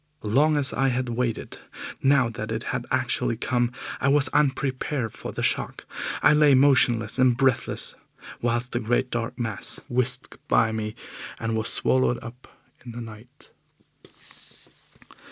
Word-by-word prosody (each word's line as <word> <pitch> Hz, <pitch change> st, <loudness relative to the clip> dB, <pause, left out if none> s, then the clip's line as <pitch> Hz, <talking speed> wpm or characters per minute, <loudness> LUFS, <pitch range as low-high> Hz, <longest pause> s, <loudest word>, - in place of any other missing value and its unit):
Long 145 Hz, +8 st, +3 dB
as 140 Hz, -2 st, +1 dB
I 135 Hz, +2 st, +1 dB
had 125 Hz, -1 st, -1 dB
waited, 120 Hz, -1 st, -3 dB, 0.4 s
now 135 Hz, -2 st, +4 dB
that 110 Hz, -1 st, -6 dB
it 110 Hz, 0 st, -3 dB
had -, -, -3 dB
actually 115 Hz, -, 0 dB
come 120 Hz, 0 st, 0 dB, 0.3 s
I 140 Hz, -, 0 dB
was 140 Hz, -1 st, +4 dB
unprepared 135 Hz, -3 st, 0 dB
for -, -, -7 dB
the -, -, -4 dB
shock. -, -, -1 dB, 0.4 s
I 150 Hz, -, +7 dB
lay 150 Hz, -2 st, +5 dB
motionless 125 Hz, -4 st, +3 dB
and 125 Hz, -2 st, +4 dB
breathless, 130 Hz, -2 st, 0 dB, 0.5 s
whilst 120 Hz, +1 st, -1 dB
the 120 Hz, -, -1 dB
great 120 Hz, +2 st, 0 dB
dark 115 Hz, 0 st, -3 dB
mass 115 Hz, -5 st, -4 dB
whisked 125 Hz, +1 st, 0 dB
by 110 Hz, 0 st, +3 dB
me 110 Hz, -1 st, -4 dB, 0.4 s
and 115 Hz, 0 st, -2 dB
was 110 Hz, +1 st, +1 dB
swallowed 130 Hz, -2 st, +2 dB
up 120 Hz, +2 st, -11 dB, 0.4 s
in 120 Hz, -2 st, -9 dB
the 120 Hz, -, -7 dB
night. 115 Hz, +5 st, -13 dB
125 Hz, 145 wpm, -25 LUFS, 115-135 Hz, 0.5 s, I